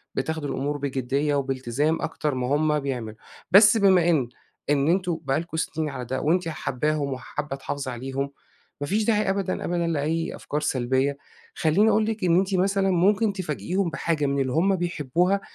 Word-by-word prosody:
بتاخدي 160 -2 -2
الأمور 145 +1 -2
بجدية 140 +1 -1
وبالتزام 135 +3 -1
أكتر 150 -3 -2
ما 125 -1 -2
هُم 150 0 +2
بيعملوا، 125 -6 -4 0.4
بس 205 +3 +8
بما 190 -5 +4
إن 140 -8 +2 0.4
إن 145 0 +2
أنتم 175 -2 +1
بقى 135 +2 0
لكم 165 -1 -6
سنين 160 -1 -2
على 125 -3 -6
ده، 130 +3 -3
وأنتِ 170 +3 +1
حاباهم 150 -1 -1
وحابة 135 +2 -5
تحافظي 135 -1 -4
عليهم، 135 +3 -4 0.5
ما 145 - -2
فيش 210 +5 +1
داعي 210 -2 +2
أبدًا، 195 -1 -1
أبدًا، 170 -1 0
لأي 165 +1 -1
أفكار 150 - -4
سلبية، 130 0 0 0.4
خلّيني 185 +8 +3
أقول 215 0 +3
لِك 220 -1 -3
إن 175 -1 +4
أنتِ 190 0 0
مثلًا 195 +1 +2
ممكن 200 +4 +3
تفاجئيهم 175 - -2
بحاجة 160 -2 -1
من 140 0 0
اللي 130 -1 -1
هُم 190 +5 +3
بيحبوها 175 +2 0
155 Hz, 170 wpm, -25 LUFS, 140-185 Hz, 0.5 s, بس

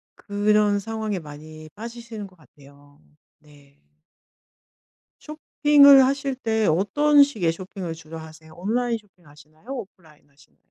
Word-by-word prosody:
그런 205 0 +1
상황에 220 -2 -4
많이 155 0 -12
빠지시는 230 -1 -9
것 185 - -22
같아요. 145 -1 -21 0.4
네. 145 -2 -22 1.4
쇼핑을 290 -2 +5
하실 275 0 -1
때 220 -4 -1
어떤 290 - +3
식의 210 -13 0
쇼핑을 185 -1 -7
주로 160 0 -11
하세요? 160 0 -13
온라인 230 +5 -1
쇼핑 185 -5 -27
하시나요? 150 - -20
오프라인 185 - -10
하시나요? 140 -1 -26
195 Hz, 285 characters per minute, -23 LUFS, 155-230 Hz, 1.4 s, 쇼핑을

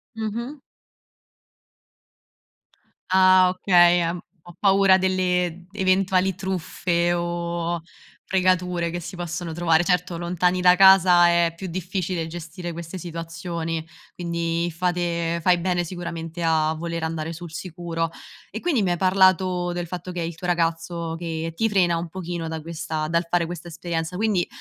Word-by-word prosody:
Mh-mh. 235 +6 -4 2.5
Ah, 185 -1 +6
okay, 175 -1 +4
ehm, 170 +1 -1 0.3
"Ho 175 - -11
paura 195 -1 +5
delle 180 -2 0
eventuali 190 -1 +2
truffe, 175 -2 -1
o 170 0 -2 0.5
fregature 180 -2 +1
che 175 - -3
si 180 +2 -8
possono 175 -1 -4
trovare." 165 0 +2
Certo, 180 -1 0
lontani 180 +1 0
da 180 0 +6
casa 185 -2 +7
è 170 -1 +3
più 190 +2 -6
difficile 180 -1 -3
gestire 175 +1 -7
queste 170 +2 -7
situazioni, 165 -1 -5 0.3
quindi, 170 0 -2
fate 170 -1 -1
fai 180 -1 +4
bene 175 0 0
sicuramente 170 -1 -6
a 160 -1 +2
voler 170 0 -4
andare 160 0 -3
sul 170 0 -9
sicuro. 170 -2 -4 0.4
E - - -6
quindi 300 -11 +1
mi 185 - +1
hai 175 - 0
parlato 185 -1 +3
del 175 0 -3
fatto 180 +1 -6
che 175 -1 -4
è - - -1
il 165 -1 -5
tuo 180 +2 -6
ragazzo 165 -1 -1
che 165 -1 -4
ti 225 +5 +1
frena 175 -4 +2
un 170 0 -4
pochino, 170 -2 -5
da 160 0 -4
questa 155 -1 -4
dal 170 +1 0
fare 175 -1 +2
questa 175 0 -7
esperienza; 165 0 -4
quindi, 205 -3 +1
175 Hz, 145 wpm, -23 LUFS, 165-185 Hz, 2.5 s, casa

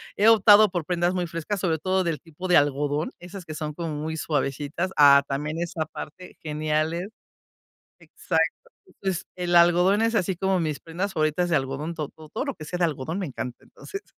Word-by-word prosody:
he 210 - +3
optado 210 -1 +7
por 175 -2 -2
prendas 175 +1 0
muy 180 -1 -1
frescas, 170 +5 -4
sobre 170 -4 0
todo 185 +4 +1
del 165 -3 -2
tipo 165 +3 -8
de 180 - +5
algodón, 145 +1 +1
esas 180 +1 -9
que 155 - -7
son 150 -1 -4
como 170 0 -4
muy 160 +2 -4
suavecitas. 145 +3 -2
Ah, 140 -1 +8
también 150 +4 -3
esa 170 -2 -2
parte, 170 +3 -10
geniales. 155 +4 -1 0.9
Exacto. - - -2 0.2
Entonces, 190 - -4
el 175 -1 0
algodón 175 +4 +5
es 230 +1 +1
así 190 -3 +1
como 190 +1 +1
mis 155 -4 -2
prendas 185 +5 -4
favoritas 155 +3 +1
de 165 - +3
algodón. 140 +4 -3
To 155 -3 -4
to 155 -1 -15
todo 225 - -3
lo 280 -2 -3
que 155 - -10
sea 180 - -4
de 175 - +2
algodón 155 +3 -4
me 190 - -2
encanta. 125 -3 -6
Entonces. 400 0 -9
170 Hz, 195 wpm, -25 LUFS, 150-185 Hz, 0.9 s, Ah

